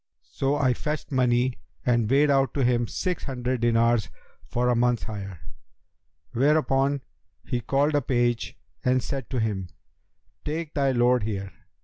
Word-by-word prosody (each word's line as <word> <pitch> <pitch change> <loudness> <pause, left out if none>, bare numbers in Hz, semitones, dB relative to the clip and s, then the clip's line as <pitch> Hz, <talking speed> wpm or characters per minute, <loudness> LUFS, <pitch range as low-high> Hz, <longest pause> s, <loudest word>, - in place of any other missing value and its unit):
So 135 +1 0
I 135 -4 +2
fetched 150 +5 -4
money 125 -1 +2 0.3
and 120 -3 +2
weighed 140 +2 +4
out 135 -2 +2
to 140 - +1
him 120 -1 +2
six 180 - -3
hundred 125 -2 -2
dinars 115 -1 +2 0.4
for 125 +1 0
a 125 - +3
month's 120 0 +2
hire, 100 -6 -6 0.9
whereupon 140 0 +2 0.4
he 120 - -2
called 140 +6 +1
a 145 - +3
page 120 -2 0 0.3
and 130 -2 +2
said 135 -2 -4
to 130 - -1
him, 100 -5 -2 0.7
'Take 155 +1 -4
thy 140 -2 +2
lord 125 0 +3
here.' 100 -2 -4
125 Hz, 145 wpm, -26 LUFS, 120-140 Hz, 0.9 s, weighed